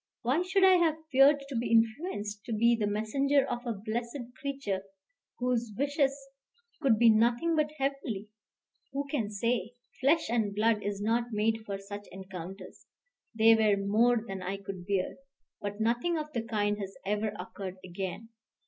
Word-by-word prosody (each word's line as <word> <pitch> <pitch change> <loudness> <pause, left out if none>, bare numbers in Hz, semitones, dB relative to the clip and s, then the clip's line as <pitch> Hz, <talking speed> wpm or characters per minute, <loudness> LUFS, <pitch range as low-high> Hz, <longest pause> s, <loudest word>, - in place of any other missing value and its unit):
Why 260 +8 +2
should 380 +2 +2
I 375 -1 +7
have 325 -3 +2
feared 275 +2 +6
to 275 - -6
be 235 +1 -1
influenced, 225 - 0
to 230 - -3
be 235 +2 +4
the 215 -2 -1
messenger 270 +7 +2
of 240 +1 -4
a 235 - 0
blessed 230 +5 -4 0.2
creature, 270 -9 -3 0.6
whose 245 -2 0
wishes 280 0 +2 0.7
could 260 -7 +4
be 230 0 +7
nothing 240 +9 +3
but 305 -1 +1
heavenly? 270 -7 -2 0.6
Who 280 +1 -1
can 230 -8 -1
say? 230 +2 -1 0.2
Flesh 305 +5 +3
and 220 -4 0
blood 215 0 +2
is 205 0 -3
not 230 +2 +2
made 220 +1 +1
for 200 -1 -3
such 205 +1 -8
encounters: 190 0 -9 0.5
they 225 0 +7
were 215 -2 +4
more 220 +4 +2
than 195 -1 -5
I 195 +2 -3
could 190 -2 -8
bear. 195 -2 -1 0.4
But 205 +1 -4
nothing 240 +10 +1
of 305 -1 -5
the 235 - 0
kind 210 -2 -1
has 195 -1 -6
ever 210 +2 0
occurred 185 0 -6
again. 190 +5 -5
225 Hz, 165 wpm, -30 LUFS, 205-270 Hz, 0.7 s, I